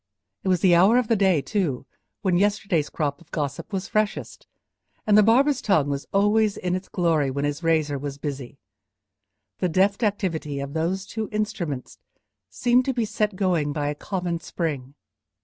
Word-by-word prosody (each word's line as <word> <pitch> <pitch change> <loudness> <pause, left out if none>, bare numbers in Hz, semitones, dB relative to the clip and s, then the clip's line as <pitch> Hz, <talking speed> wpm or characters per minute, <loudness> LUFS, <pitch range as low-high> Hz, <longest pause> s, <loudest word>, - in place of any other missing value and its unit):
It - - -5
was 180 -2 +2
the 185 -3 +5
hour 190 +8 +6
of 250 -3 +1
the 230 - +4
day, 190 -8 +3
too, 170 - -1 0.4
when 185 -3 +2
yesterday's 195 -5 +1
crop 145 -2 -2
of 170 - -20
gossip 145 +1 -4
was 195 -1 -3
freshest, 215 0 -2 0.6
and 210 - +4
the 215 - +8
barber's 255 +5 +4
tongue 155 -9 +2
was 140 0 -3
always 205 +1 +2
in 180 -1 -2
its 185 +1 -4
glory 165 -6 +1
when 140 +2 -2
his 145 +2 -2
razor 155 -4 +1
was 140 0 -5
busy; 140 -3 -6 1.0
the 180 - +1
deft 195 +5 +2
activity 170 -9 -1
of 140 0 -5
those 175 +4 -1
two 220 +1 -5
instruments 205 - -3 0.5
seemed 245 - +2
to 265 - -1
be 235 -3 +1
set 210 -1 -1
going 175 -7 0
by 145 -1 -1
a - - -1
common 175 +1 -3
spring. 145 -6 -4
180 Hz, 175 wpm, -24 LUFS, 145-205 Hz, 1.0 s, the